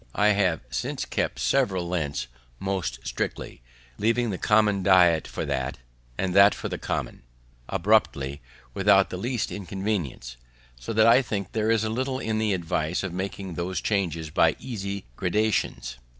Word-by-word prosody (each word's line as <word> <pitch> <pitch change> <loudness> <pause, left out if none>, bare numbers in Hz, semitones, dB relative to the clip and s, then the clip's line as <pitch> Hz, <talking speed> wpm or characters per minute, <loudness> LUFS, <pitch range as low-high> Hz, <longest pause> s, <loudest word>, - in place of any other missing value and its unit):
I 105 +1 +4
have 95 -6 +2
since - - -3
kept - - -2
several 85 +8 +1
Lents 80 -7 -2 0.3
most 95 -8 -2
strictly, - - -4 0.4
leaving 115 +2 +1
the 95 - -4
common 105 -2 +3
diet 90 -4 +5
for - - -4
that, 65 0 -2 0.4
and 95 -2 -1
that 100 0 +7
for - - -5
the - - -4
common, - - -3 0.5
abruptly, 70 -9 +1 0.3
without 95 0 +4
the 90 - -4
least 120 +4 -2
inconvenience, 95 - -4 0.4
so - - -7
that 110 0 +4
I 115 +3 +7
think 100 -7 -4
there 110 0 0
is 115 -1 +3
little 130 +4 -1
in 110 -4 -2
the 110 -1 +1
advice 85 -1 -1
of 95 -3 -4
making 95 0 -4
those 90 +3 -2
changes 85 -7 -1
by - - +3
easy 100 -5 -5
gradations. 95 - 0
95 Hz, 150 wpm, -26 LUFS, 85-110 Hz, 0.5 s, that